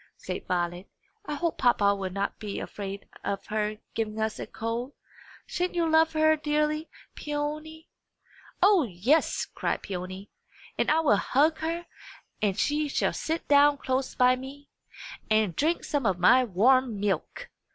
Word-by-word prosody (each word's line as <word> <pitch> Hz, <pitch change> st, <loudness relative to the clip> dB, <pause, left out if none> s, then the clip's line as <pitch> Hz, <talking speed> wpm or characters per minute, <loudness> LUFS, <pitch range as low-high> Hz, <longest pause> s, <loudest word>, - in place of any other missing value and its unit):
said 185 Hz, -, -5 dB
Violet. 175 Hz, +1 st, -2 dB, 0.4 s
"I 295 Hz, -, -2 dB
hope 335 Hz, +2 st, -2 dB
papa 205 Hz, -5 st, +4 dB
will 195 Hz, -2 st, -3 dB
not 200 Hz, +2 st, -3 dB
be 210 Hz, -2 st, -5 dB
afraid 200 Hz, -1 st, -6 dB, 0.2 s
of 200 Hz, -, -3 dB
her 215 Hz, 0 st, -1 dB, 0.2 s
giving 220 Hz, -1 st, -3 dB
us 220 Hz, 0 st, -2 dB
a -, -, -5 dB
cold! 235 Hz, +4 st, -4 dB, 0.5 s
Sha'n't 360 Hz, 0 st, -2 dB
you 340 Hz, -1 st, +1 dB
love 320 Hz, 0 st, +4 dB
her 315 Hz, 0 st, +4 dB
dearly, 300 Hz, +1 st, -1 dB, 0.2 s
Peony?" 305 Hz, +2 st, -5 dB, 0.8 s
"O 395 Hz, -2 st, +6 dB
yes!" 240 Hz, -, +1 dB
cried -, -, -2 dB
Peony. 185 Hz, +1 st, -6 dB, 0.4 s
"And -, -, 0 dB
I 315 Hz, +1 st, +4 dB
will 225 Hz, -10 st, +4 dB
hug 300 Hz, +9 st, +2 dB
her 335 Hz, +2 st, -3 dB, 0.6 s
and 200 Hz, -3 st, +1 dB
she 295 Hz, +1 st, +1 dB
shall 280 Hz, -, 0 dB
sit 320 Hz, +1 st, -3 dB
down 285 Hz, 0 st, +5 dB
close 260 Hz, -1 st, -2 dB
by 250 Hz, 0 st, +5 dB
me, 275 Hz, +3 st, -10 dB, 0.6 s
and 215 Hz, -5 st, +2 dB
drink 325 Hz, +4 st, +1 dB
some 280 Hz, -6 st, -1 dB
of 190 Hz, -2 st, +1 dB
my 250 Hz, +9 st, +5 dB
warm 240 Hz, +2 st, +3 dB
milk!" 195 Hz, -5 st, -2 dB
255 Hz, 150 wpm, -27 LUFS, 205-305 Hz, 0.8 s, O